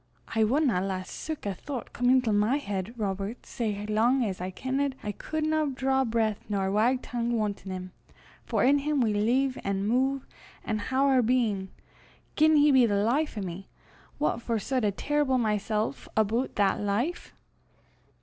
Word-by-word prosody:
"I 225 -1 +2
wadna 245 -4 +2
lat 190 -1 -3
sic 310 +5 -6
a 200 - -1
thoucht 260 - -7
come 245 0 +1
intil 250 -4 +4
my 210 +6 +3
heid, 200 -7 -4
Robert, 200 +1 -3
sae 210 -4 -3
lang 235 +4 +2
as 190 -4 -4
I 185 - -3
kenned 265 +7 -2
I 210 - -2
cudna 310 +3 -1
draw 265 +1 +1
breath 225 -2 0
nor 195 -2 0
wag 240 +5 +2
tongue 240 -1 -2
wantin' 205 -3 -3
him, 185 0 -6 0.5
for - - 0
in 280 +3 +5
him 295 0 0
we 225 -4 +2
leeve 250 +6 +1
an' 200 0 -1
muv 265 +3 +1 0.4
an' 215 -1 -1
hae 235 +5 -4
oor 270 -1 +4
bein'. 220 -5 +1 0.7
Gien 310 +1 +5
he 295 0 +6
be 255 -3 +6
the 205 - +1
life 275 +4 0
o' - - -2
me, 185 +1 -6 0.5
what 290 -5 0
for 230 -1 -1
sud 255 +3 -1
I - - +3
trible 285 +5 0
mysel' 215 0 0 0.2
aboot 220 +4 +1
that 200 -1 +2
life?" 225 +12 -2
230 Hz, 170 wpm, -28 LUFS, 205-265 Hz, 0.7 s, he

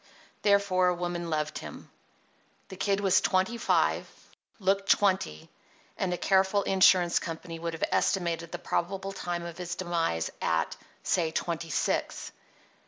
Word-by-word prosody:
Therefore 200 -3 +3
a 180 - +2
woman 175 -1 -3
loved 150 -1 -2
him. - - -10 0.8
The 190 - -8
Kid 200 +1 0
was 195 -2 +4
twenty 190 +5 +1
five, 235 - +1 0.5
looked 195 0 0
twenty; 185 - +2 0.5
and 185 - -1
a 180 - -1
careful 195 +2 +2
insurance 185 -2 +4
company 165 0 -6
would 170 0 -3
have 165 - -5
estimated 170 -3 0
the 175 - -4
probable 195 +3 -2
time 175 -3 -4
of 170 0 -8
his 175 -1 -4
demise 165 - -1
at, 80 -1 0 0.3
say, 170 -3 +1
twenty 165 0 -3
six. 145 - -1
175 Hz, 140 wpm, -28 LUFS, 165-195 Hz, 0.8 s, was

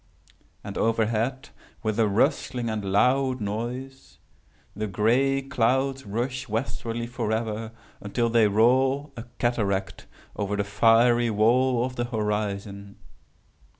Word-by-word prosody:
And - - -6
overhead, 115 +4 0 0.3
with 110 0 -1
a 110 - +4
rustling 115 +3 0
and 110 -2 -3
loud 130 +5 +2
noise, 120 - -5 0.6
the 110 +2 -3
gray 125 +7 +2
clouds 135 0 0
rush 125 +4 -3
westwardly 115 +1 -3
forever, 110 -1 -3 0.3
until 115 +4 -1
they 115 -2 +4
roll, 130 +7 +2
a 115 -1 -8
cataract, 100 -5 -1 0.3
over 105 0 -2
the 100 - 0
fiery 115 +3 +4
wall 120 +3 +2
of 130 0 -7
the 120 - 0
horizon. 105 -3 -3
115 Hz, 115 wpm, -25 LUFS, 105-125 Hz, 0.6 s, a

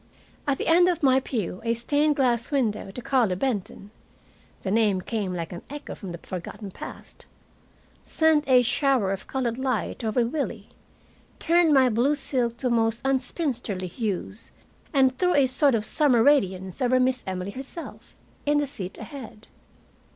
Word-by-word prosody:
At 275 -1 +1
the - - -3
end 350 +2 +5
of 350 -4 0
my 265 -1 +5
pew 215 -8 -4
a 230 0 +1
stained 290 +5 +1
glass 245 -4 +1
window 225 -9 0
to 220 +6 -7
Carlo 250 -8 +2
Benton 205 -2 -3 0.7
the 190 - -2
name 210 -3 +3
came 205 -1 -3
like 170 -1 -4
an 175 - -7
echo 290 +1 -7
from 195 -5 -8
the 170 - -6
forgotten 185 +4 -7
past - - -11 0.8
sent 315 -2 +2
a 250 -1 +6
shower 250 -5 +2
of 195 - -5
colored 250 -2 -2
light 255 -3 -2
over 225 +2 +1
Willie, 280 +5 -4 0.7
turned 335 -1 +3
my 265 -3 +6
blue 245 +5 +2
silk 250 -4 -1
to 250 0 -1
most 225 -1 +1
unspinsterly 260 - -1
hues, 205 +1 -3 0.4
and 265 -3 +3
threw 360 -1 +3
a 280 -2 +5
sort 260 +1 +3
of 215 -1 -1
summer 255 -4 +4
radiance 190 -8 +2
over 255 0 +3
Miss 255 -1 +1
Emily 185 +1 -3
herself, 270 +8 -8 0.3
in 295 0 +2
the 290 - +2
seat 200 -10 -7
ahead. 240 -7 -10
250 Hz, 160 wpm, -25 LUFS, 210-275 Hz, 0.8 s, a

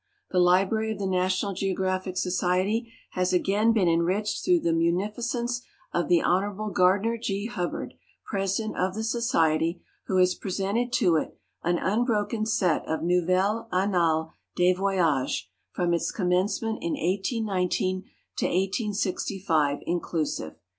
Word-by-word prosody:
The 185 - +2
library 190 +5 +3
of 215 - -4
the 200 - -3
National 185 +1 0
Geographic 185 -1 -2
Society 185 +6 0 0.2
has 185 0 0
again 200 +5 +3
been 210 -6 +2
enriched 175 +5 +1
through 355 -2 +3
the 165 - +1
munificence 210 +8 -1 0.3
of 175 -3 0
the 175 -2 +3
Hon. 205 +3 0
Gardiner 200 +6 +3
G. 200 -2 -2
Hubbard, 180 -7 -4 0.3
president 195 +2 -2
of 185 +1 0
the 220 - -3
Society, 170 - +1 0.3
who 190 - +1
has 180 0 +4
presented 200 +6 -2
to 170 -3 +3
it - - -4 0.2
an 175 +1 +1
unbroken 215 +2 0
set 180 -7 +1
of 160 0 -2
Nouvelles 185 +6 +1
Annales 170 -4 +1 0.2
des 180 +1 +4
Voyages 180 -8 0 0.3
from 175 -1 0
its 170 - 0
commencement 200 +4 0
in 335 -1 -2
1819 190 - -1 0.3
to - - 0
1865, 190 - 0
inclusive. 165 - -2
190 Hz, 130 wpm, -26 LUFS, 180-215 Hz, 0.3 s, has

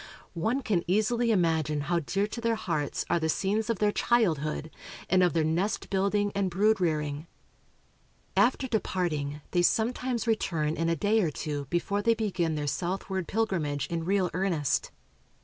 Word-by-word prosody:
One 225 +11 -1
can 185 -7 +1
easily 230 +5 +2
imagine 160 -7 +1
how 170 +4 0
dear 195 +6 -1
to 225 +3 -6
their 230 0 +1
hearts 165 -9 -2
are 170 - +2
the 160 -1 -1
scenes 210 +7 0
of 230 - +1
their 210 +1 +2
childhood, 160 -10 +1 0.4
and 185 0 +5
of 180 -1 +3
their 165 -1 +2
nest 170 +7 -1
building 200 +1 +1
and 200 -2 0
brood 205 +3 +2
rearing." 150 -2 -1 1.1
After 260 +2 +3
departing, 160 - -1
they 175 - +2
sometimes 240 +5 +1
return 165 -9 0
in 165 0 0
a 165 - +2
day 210 +7 +2
or 170 - +1
two 145 0 -4
before 200 +4 0
they 230 +2 +3
begin 185 -7 -1
their 150 -1 -2
southward 185 +5 -2
pilgrimage 165 - -1
in 165 -1 -1
real 185 0 +1
earnest. 175 -6 0
185 Hz, 165 wpm, -28 LUFS, 160-215 Hz, 1.1 s, and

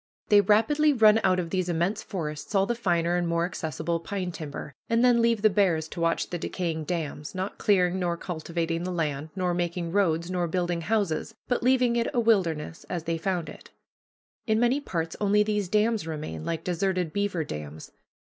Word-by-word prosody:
They 205 -2 +7
rapidly 290 +9 +3
run 220 -3 +6
out 185 0 +3
of 170 -2 -4
these 185 -2 0
immense 175 +6 0
forests 155 -2 -5
all 195 0 +4
the 240 - 0
finer 175 -6 +1
and 175 -1 0
more 170 0 +1
accessible 165 -1 -3
pine 180 +1 -4
timber, 150 -3 -7 0.2
and 230 +1 +3
then 240 -1 +5
leave 230 -2 +2
the - - +8
bears 180 -6 +2
to 170 - -6
watch 165 0 0
the 175 - -3
decaying 165 -3 -3
dams, 155 -2 -4
not 185 +2 -4
clearing 185 -2 +2
nor 175 -2 -1
cultivating 165 -1 -3
the 185 - -3
land, 155 -3 -2
nor 180 -2 0
making 175 -1 -2
roads, 170 -3 +1
nor 175 -1 0
building 175 0 -1
houses, 205 +1 -1
but 245 - 0
leaving 250 -1 +3
it 235 - +1
a - - +3
wilderness, 170 -9 +1
as 175 -3 -3
they 165 0 -2
found 175 -1 -1
it. - - -11 0.8
In 220 0 +2
many 245 +4 +2
parts 165 - -3
only 210 0 +4
these 210 -3 -1
dams 215 -2 +1
remain, 150 - -5
like 165 - -3
deserted 180 -1 -1
beaver 200 -5 0
dams. 75 - -7
180 Hz, 190 wpm, -27 LUFS, 165-210 Hz, 0.8 s, the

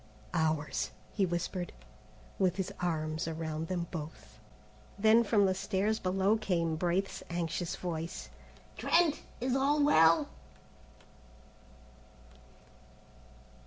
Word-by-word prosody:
"Ours," 155 -3 0 0.2
he 195 -3 +2
whispered, 175 +1 -3 0.7
with 185 -2 +2
his 190 -2 -3
arms 160 -2 -1
around 160 0 -3
them 175 -1 -2
both. 150 -9 -8 0.6
Then 220 +3 +5
from 205 -2 +3
the 190 - +3
stairs 205 +3 0
below 195 +3 +2
came 170 -6 0
Braith's 180 +4 -1
anxious 170 0 -2
voice. 170 0 -5 0.5
"Trent! 335 -3 +3 0.2
Is 255 +1 0
all 285 +2 +3
well?" 165 - +5
180 Hz, 95 wpm, -32 LUFS, 165-205 Hz, 0.7 s, Then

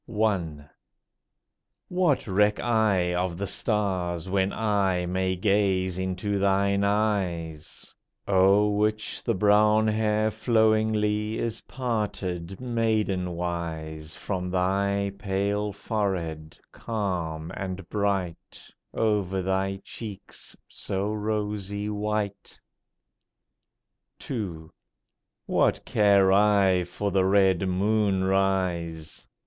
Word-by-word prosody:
SONG. 100 -9 -1
I. 70 - -23 1.2
What 180 -6 +1
reck 105 +1 +2
I 105 -7 +2
of 90 -1 -1
the 100 - -2
stars, 95 -6 -1
when 95 +1 +1
I 100 -5 0
May 95 +1 -1
gaze 95 -2 +1
into 95 +2 -2
thine 100 0 +2
eyes, 95 -7 -2 0.3
O'er 100 +2 +4
which 105 +1 -1
the 115 - 0
brown 105 +2 +4
hair 110 0 +1
flowingly 110 -1 +1
Is 115 -2 -3
parted 100 -7 -3
maidenwise 90 -9 -2
From 90 -2 -3
thy 100 +2 0
pale 100 +1 -1
forehead, 95 -7 -3
calm 85 -8 -3
and 95 -2 -5
bright, 100 -5 -3 0.2
Over 100 -4 0
thy 95 +1 -1
cheeks 105 -4 -9
so 100 +2 -3
rosy 105 -1 -3
white? 105 -1 -3 1.7
II. 85 -10 -4 0.8
What - - +1
care 100 -2 +4
I 100 -3 +4
for 100 +3 -3
the 95 0 +3
red 95 -1 +3
moon 100 +1 +1
rise? 95 -4 -1
100 Hz, 95 wpm, -26 LUFS, 90-105 Hz, 1.7 s, O'er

